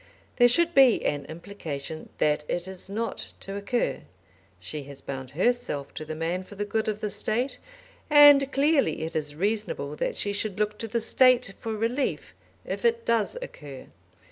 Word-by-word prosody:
There 245 - +7
should 340 +8 +3
be 270 -5 +5
an 145 -1 -1
implication 160 -3 -7
that 150 0 +1
it 175 +1 -2
is 190 0 -4
not 220 +1 -3
to 195 - -6
occur. 200 +4 -1 0.6
She 150 +12 -6
has 140 -1 -10
bound 130 -2 -6
herself 180 - -1
to - - -6
the 155 0 -6
man 165 +3 -2
for 190 +2 -12
the 205 +1 -3
good 220 +1 -1
of 215 0 -2
the 210 - -2
State, 245 +7 0 0.5
and 290 -2 +8
clearly 275 - +2
it 160 - -5
is 150 -2 -2
reasonable 195 -6 -2
that - - -2
she 205 - -2
should 205 -1 -2
look 210 0 -1
to 225 - -4
the 235 +2 -1
State 250 -2 +4
for 225 - -4
relief 235 +6 -2 0.3
if - - -4
it 465 0 +2
does 230 - +1
occur. 145 - -10
205 Hz, 175 wpm, -26 LUFS, 155-245 Hz, 0.6 s, and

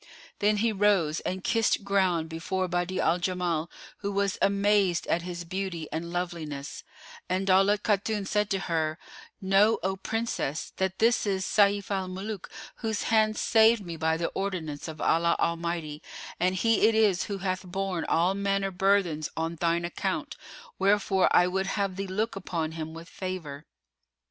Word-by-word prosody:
Then 210 +1 +3
he 225 +2 +2
rose 195 -7 +2
and 185 0 -4
kissed 225 -2 +2
ground 190 -5 +1
before 185 +3 -2
Badi'a 180 +1 -1
al 175 - +2
Jamal 175 -3 -1 0.3
who 200 -1 -3
was 200 -1 0
amazed 200 -2 +2
at 170 - 0
his 175 0 -6
beauty 180 -3 -4
and 165 +2 -4
loveliness; 165 -5 -4 0.5
and 185 +2 0
Daulat 195 +2 +4
Khatun 205 0 0
said 210 +1 0
to 195 - 0
her, 160 -3 -1 0.4
"Know, 195 +3 +4
O 190 +1 0
Princess, 195 -7 -3
that 190 0 -1
this 230 -1 +3
is 190 -1 0
Sayf 200 -1 +2
al 190 -2 -1
Muluk, 195 +2 -6 0.3
whose 220 -3 -2
hand 215 -1 +2
saved 225 -2 +4
me 170 -1 -5
by 160 0 0
the 170 - -1
ordinance 170 -7 -4
of 160 -1 -8
Allah 170 +1 +3
Almighty 170 -3 -2 0.4
and 185 +2 +2
he 225 +2 +3
it 225 - +2
is 210 -5 +3
who 200 - -4
hath 185 -1 -2
borne 185 -1 -3
all 175 +3 +2
manner 195 0 0
burthens 185 -5 +1
on 165 +1 -1
thine 170 +1 +1
account: 175 - -3 0.4
wherefore 195 -1 +3
I 175 - +5
would 190 +1 -1
have 195 -2 -1
thee 195 +1 -4
look 210 +4 -2
upon 170 -4 -3
him 160 0 -6
with 165 +1 -9
favour." 175 -7 -6
190 Hz, 165 wpm, -28 LUFS, 170-200 Hz, 0.5 s, I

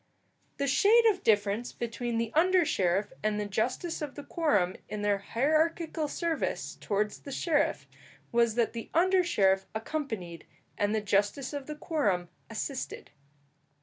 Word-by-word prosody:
The 280 - 0
shade 425 - +5
of 380 -2 -6
difference 210 - +1
between 235 0 -3
the 230 -1 -1
under 360 +2 +4
sheriff 195 - +1
and 215 0 0
the 210 - -1
justice 250 - -2
of 295 -2 -5
the 290 - -7
quorum, 210 - +1
in 210 0 -4
their 205 -1 +2
hierarchical 310 - 0
service 330 +2 -2
towards 210 0 -1
the 280 - -9
sheriff, 305 +2 +1 0.5
was 235 -2 +3
that 235 -2 +1
the 230 -1 -6
under 370 +2 +4
sheriff 195 - +2
accompanied 220 - -4 0.3
and 205 +1 0
the 215 - +1
justice 205 +7 0
of 285 -2 -5
the 300 - -5
quorum 200 - 0 0.2
assisted. 250 +4 -5
235 Hz, 150 wpm, -29 LUFS, 205-310 Hz, 0.5 s, shade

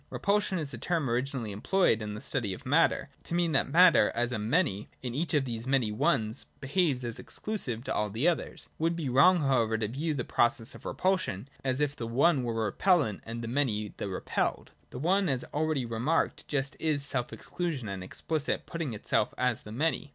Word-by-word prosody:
Repulsion 200 -1 +1
is 150 -4 -3
a 115 - -6
term 160 +1 0
originally 120 -1 -1
employed 115 - +2
in 105 -1 -4
the 105 - -7
study 100 -5 -2
of 140 - -14
matter, 150 +2 +3
to 170 - -3
mean 175 -1 +2
that 135 - +2
matter, 175 +3 +6
as 120 +1 0
a 120 - -2
Many, 110 - 0
in 125 -2 -3
each 160 +5 -1
of 140 -2 +2
these 115 -1 -4
many 130 -5 +2
Ones, 110 +1 0
behaves 140 -2 +1
as 120 -1 -1
exclusive 130 - -3
to - - -2
all 105 0 0
the 115 - 0
others. 175 - -1
It - - -17
would 165 +1 +2
be 160 -6 -3
wrong 155 +8 +5
however 120 -6 +2
to 110 -1 -1
view 150 +7 -2
the 125 - -2
pro 120 - +4
cess 115 0 -7
of - - -13
repulsion, 185 - -1
as 130 0 0
if 145 -1 0
the 115 - -5
One 135 +5 +3
were 115 -2 -2
the - - -1
repellent 125 - +2
and 115 +1 -5
the - - -4
Many 115 -5 -1
the - - -3
repelled. 95 - -2 0.2
The - - -8
One, 185 +6 +2
as 130 -2 0
already 155 -3 0
remarked, 120 +8 -1
just 140 -1 -1
is 150 -3 0
self 125 -4 -2
exclusion 160 -10 -4
and 95 -2 -5
explicit 155 - -2
putting 160 -9 -4
itself 105 0 0
as 125 -3 +1
the 105 - -10
Many. 145 +3 -1
135 Hz, 210 wpm, -29 LUFS, 115-160 Hz, 0.2 s, matter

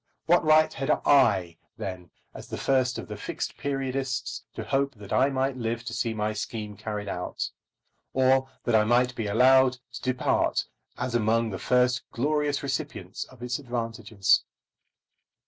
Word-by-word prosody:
What 175 +1 +4
right 155 0 +5
had 135 +1 -4 0.2
I, 100 - +4 0.2
then, 95 -5 -6 0.2
as - - -10
the - - -5
first 130 -2 +1
of - - -6
the - - -6
Fixed - - -4
Periodists, 135 -2 -2
to - - -4
hope 140 0 0
that 100 -2 -8
I 135 +2 +4
might 135 -1 -1
live 115 -1 -2
to 115 - -5
see 115 -1 -1
my 105 0 -1
scheme 105 0 -5
carried 105 0 -5
out, 90 -2 -3 0.6
or 130 0 +3
that 120 - 0
I 110 -1 +6
might 125 +3 +3
be 115 -3 -3
allowed 130 +4 +5 0.2
to - - -7
depart 130 -1 +1 0.3
as 125 -1 -3
among 115 0 +2
the 95 - -5
first 125 0 +2
glorious 145 +3 0
recipients 105 -8 -4
of 125 -2 -14
its 125 +1 -2
advantages? 115 -5 0
125 Hz, 160 wpm, -27 LUFS, 110-135 Hz, 0.6 s, I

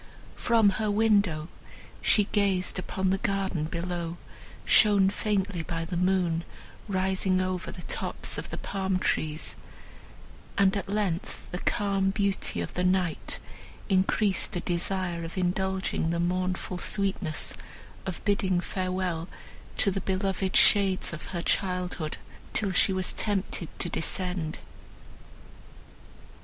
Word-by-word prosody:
From 225 -4 +4
her 215 - +1
window 205 -7 +3 0.5
she 210 - +5
gazed 195 -3 +1
upon 190 0 -1
the 195 - +1
garden 195 -7 0
below, 170 0 -3 0.5
shown 200 -3 +6
faintly 200 -4 0
by 165 +1 -3
the 175 +2 -4
moon, 180 -2 +2 0.4
rising 190 -1 +1
over 185 -1 -2
the 175 - -9
tops - - -2
of - - -7
the - - -5
palm 190 -1 -1
trees, 155 -3 -1 1.0
and, 195 0 +4
at 200 -1 -3
length, 200 -4 -2
the 180 - -3
calm 195 -1 +1
beauty 195 - 0
of 85 - -5
the 180 - -1
night 180 -2 +1 0.5
increased 190 +1 +2
a - - +1
desire 175 0 -1
of 165 +3 -7
indulging 190 -1 0
the 170 0 0
mournful 180 +1 -1
sweetness 195 -5 -1 0.5
of 190 -2 -6
bidding 190 -3 +2
farewell 185 -2 -2 0.5
to 200 - +4
the 195 0 -2
beloved 190 0 -1
shades 195 -4 +5
of 155 - -6
her 170 -2 -4
childhood, 180 -5 -1 0.4
till 205 -3 +1
she 185 - +4
was 185 -1 -1
tempted 195 -4 -1
to - - -1
descend. 180 -2 -2
185 Hz, 125 wpm, -28 LUFS, 175-195 Hz, 1.0 s, shown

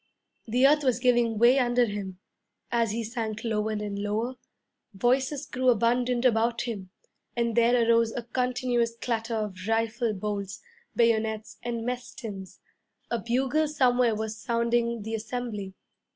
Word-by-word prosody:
The 250 +4 +3
earth 295 +2 +5
was 255 -4 +2
giving 240 -3 +2
way 240 +4 +6
under 245 -1 +3
him. 200 -3 -5 0.5
As 235 -1 +2
he 230 +3 -2
sank 225 -1 -4
lower 215 -1 -1
and 210 -1 -3
lower, 215 +5 -1 0.6
voices 260 +6 +1
grew 255 -1 0
abundant 245 +2 +2
about 230 -1 +2
him; 205 -6 -5 0.5
and 235 -2 0
there 235 0 +4
arose 230 -1 +4
a 240 - -4
continuous 245 -1 0
clatter 230 -1 -2
of 210 -3 -2
rifle 225 +1 0
bolts, 200 0 -4 0.4
bayonets, 220 -2 +1
and 235 -1 -3
mess 250 0 -4
tins. 195 -6 -8 0.5
A 235 - 0
bugle 265 +7 +1
somewhere 250 -5 +2
was 220 0 -3
sounding 235 0 0
the 220 +1 -5
assembly. 220 -3 -4
235 Hz, 140 wpm, -27 LUFS, 220-245 Hz, 0.6 s, way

